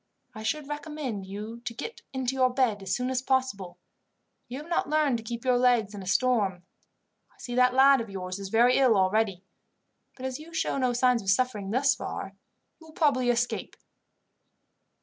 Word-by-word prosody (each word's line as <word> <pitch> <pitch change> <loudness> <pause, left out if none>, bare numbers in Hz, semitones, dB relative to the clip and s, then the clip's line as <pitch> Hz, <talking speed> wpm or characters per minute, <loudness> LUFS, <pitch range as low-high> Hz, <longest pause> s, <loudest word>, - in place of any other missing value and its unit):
I 215 - -8
should 280 +6 -2
recommend 295 -9 -5
you 210 +4 -7
to 235 -1 -5
get 460 - -7
into 260 -1 -2
your 260 -1 +3
bed 245 -6 +1
as 190 - -1
soon 250 +1 -2
as 255 -1 0
possible. 255 -9 -1 0.7
You 250 +1 -6
have 300 +3 -9
not 340 -4 -1
learned 300 -5 +2
to - - -10
keep 235 +2 -6
your 250 -1 +3
legs 240 -5 +3
in 205 - -7
a 190 - -9
storm. 205 -5 +1 0.7
I - - -31
see 245 - -7
that 250 0 +3
lad 270 -1 +6
of 230 - -7
yours 185 -1 -5
is 195 -1 -6
very 240 +4 +4
ill 255 -6 +4
already, 195 0 +1 0.7
but 260 - -7
as 260 +1 -4
you 320 +2 -11
show 275 - 0
no 255 -2 +1
signs 245 -1 +2
of 195 - -4
suffering 210 -2 +1
thus 260 +5 +3
far, 195 - -6 0.5
you 320 - -16
will 315 - -15
probably 275 -7 +2
escape." 245 0 -1
245 Hz, 190 wpm, -27 LUFS, 210-265 Hz, 0.7 s, lad